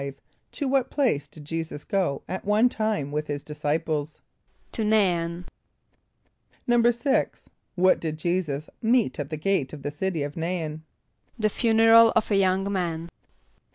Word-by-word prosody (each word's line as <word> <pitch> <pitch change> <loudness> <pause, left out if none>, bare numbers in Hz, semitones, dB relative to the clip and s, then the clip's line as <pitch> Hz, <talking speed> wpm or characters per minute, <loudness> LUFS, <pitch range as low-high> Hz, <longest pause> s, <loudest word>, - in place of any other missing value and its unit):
= - - -43
To 285 - -3
what 265 -1 +1
place 250 - 0
did 150 -2 -13
J[=e]´[s+]us 160 -1 -5
go 185 -8 -1
at 185 - -4
one 210 +4 +3
time 215 - -2
with 150 +1 -2
his 145 -1 -4
disciples? 150 0 -2 0.5
=To - - -3
N[=a]´in.= 180 -5 +1 1.2
=6.= 240 +2 +2 0.3
What 185 0 +4
did 155 -2 -4
J[=e]´[s+]us 155 -3 -2
meet 230 - +2
at 145 -1 -4
the 155 - -4
gate 155 -4 0
of 145 -2 -9
the 145 - -3
city 165 0 -2
of 145 0 -5
N[=a]´in? 165 -2 -3 0.6
=The 215 -2 +1
funeral 225 +1 +5
of 220 -1 +1
a - - +4
young 195 +1 +2
man. 170 -3 -2
180 Hz, 150 wpm, -25 LUFS, 155-220 Hz, 1.2 s, funeral